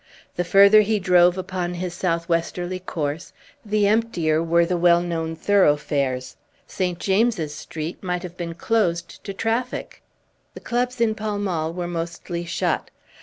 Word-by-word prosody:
The 180 - 0
further 200 +4 +7
he 215 +1 +1
drove 180 -2 +4
upon 185 -1 -3
his 175 0 -4
southwesterly 175 +1 -1
course, 160 -2 -4 0.3
the 210 -1 +1
emptier 190 -8 +1
were 170 +1 +3
the 180 +1 -1
well 175 0 +4
known 165 -2 -3
thoroughfares. 145 -8 +1 0.3
St. 180 -2 -2
James's 195 -5 +1
Street 155 +2 -6
might 180 -1 -3
have 175 -1 -8
been 170 -2 -5
closed 175 -5 -1
to - - -5
traffic; 225 +5 -3 0.5
the - - -7
clubs 245 0 -2
in 225 -2 +3
Pall 215 -1 -3
Mall 170 -6 -1
were 175 0 -4
mostly 170 0 -4
shut. 170 - -1
175 Hz, 145 wpm, -23 LUFS, 170-200 Hz, 0.5 s, further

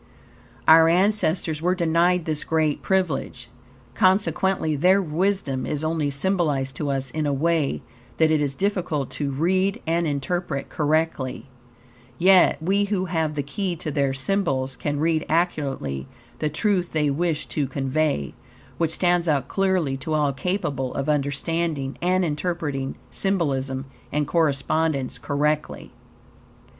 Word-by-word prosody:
Our 160 0 +8
ancestors 175 -4 +1
were 180 +2 +2
denied 170 0 +2
this 155 -2 0
great 155 -2 0
privilege. 155 -10 -1 0.4
Consequently 190 -1 +2
their 180 +7 +4
wisdom 170 -6 -1
is 150 0 -2
only 155 -2 0
symbolized 140 -4 0
to 150 - -2
us 135 -1 -2
in 155 -1 -1
a - - +1
way 155 0 0 0.3
that 160 -1 +4
it 155 -1 +2
is 140 -2 -1
difficult 180 -6 -1
to 145 -2 -3
read 185 - +1
and 165 +1 +1
interpret 145 0 -2
correctly, 150 -4 -1 0.7
yet 185 +1 +5
we 200 +4 +2
who 195 -2 -1
have 160 -4 -1
the 145 - -1
key 195 -1 -3
to 155 -1 -5
their 140 -2 +1
symbols 135 -3 -1
can 145 +1 -3
read 160 0 +1
accurately 140 - -1 0.3
the 155 - 0
truth 180 +2 0
they 150 -2 +1
wish 160 +1 -1
to 145 -3 -1
convey, 135 - -1 0.5
which 165 -2 +2
stands 175 -1 +2
out 145 -4 +1
clearly 185 -8 +1
to 155 +4 -3
all 145 -2 +1
capable 140 -5 -2
of 140 +2 -2
understanding 145 0 -1
and 185 +1 +2
interpreting 150 -4 -2 0.2
symbolism 135 -9 -1 0.3
and 150 0 0
correspondence 150 -2 0
correctly. 150 +1 -1
155 Hz, 135 wpm, -24 LUFS, 140-175 Hz, 0.7 s, Our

